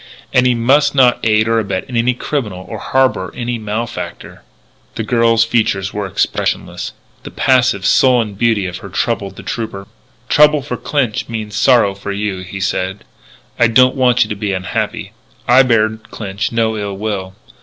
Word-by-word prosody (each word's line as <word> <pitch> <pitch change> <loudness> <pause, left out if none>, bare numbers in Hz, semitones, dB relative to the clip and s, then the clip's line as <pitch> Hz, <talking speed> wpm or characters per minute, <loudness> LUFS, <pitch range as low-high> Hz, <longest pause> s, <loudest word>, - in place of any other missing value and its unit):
And 125 0 +4
he 125 - +2
must 135 +6 +3
not 125 -3 +4
aid 110 0 +3
or 115 0 +2
abet 100 -3 -3
any 125 0 0
criminal, 105 -10 -4
or 110 - -6
harbour 130 -9 0
any 120 -1 -3
malefactor." 110 +2 -5 0.5
The 115 - -3
girl's 115 0 +3
features 105 -4 0
were 105 -1 -3
expressionless. - - -2 0.3
The - - -9
passive, 130 -7 +2
sullen 120 -4 +3
beauty 110 -1 +1
of 90 -1 -5
her - - -10
troubled - - -2
the - - -10
trooper. 110 -4 -5 0.4
"Trouble 150 -1 +4
for 145 - -4
Clinch 125 -8 -2
means 110 -2 -5
sorrow 110 -3 +4
for 100 +1 -6
you," 100 -1 -3
he 95 +2 -7
said. 95 0 -2 0.6
"I 120 - +5
don't 125 +3 +4
want 125 -2 +3
you 110 - -7
to 105 - -3
be 100 -1 -2
unhappy. 95 -1 -3 0.4
I 125 +2 +7
bear 115 -4 +3
Clinch 105 -2 -5
no 115 -1 0
ill 100 -1 -4
will. 95 -3 -4
110 Hz, 165 wpm, -16 LUFS, 100-125 Hz, 0.6 s, I